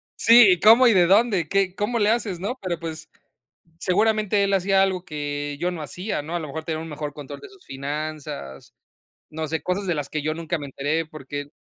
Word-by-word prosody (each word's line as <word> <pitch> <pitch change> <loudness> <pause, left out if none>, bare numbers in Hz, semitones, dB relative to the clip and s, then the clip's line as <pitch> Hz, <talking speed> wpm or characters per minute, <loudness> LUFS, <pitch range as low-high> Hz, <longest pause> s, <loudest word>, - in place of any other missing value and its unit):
sí, 230 -3 +7
¿y 180 - -3
cómo 230 +6 +7
y 230 - +5
de 180 -3 +4
dónde? 195 -3 +3
¿Qué? 195 -2 +1
¿Cómo 210 +5 -1
le 210 - +3
haces?, 215 -6 -1
no, 205 +8 -4
pero 175 -3 -3
pues, 160 -1 -7 0.7
seguramente 210 +2 +2
él 200 0 0
hacía 195 0 +3
algo 190 -2 0
que 145 -3 -4
yo 175 +2 0
no 170 -3 -6
hacía, 180 +5 -4
¿no?, 160 +4 -6
a - - 0
lo 155 - -6
mejor 160 +3 -6
tenía 160 -2 -3
un 165 - -8
mejor 150 -1 -5
control 145 -3 -9
de 410 - -12
sus 390 -2 -20
finanzas. 145 - -6 0.6
No 155 0 -4
sé, 160 +2 -3
cosas 190 +2 -2
de 175 - 0
las 145 -2 -4
que 155 - -3
yo 155 - -1
nunca 165 +1 -3
me 145 - -7
enteré 145 +4 -2
porque, 145 -2 -7
170 Hz, 220 wpm, -23 LUFS, 150-200 Hz, 0.7 s, sí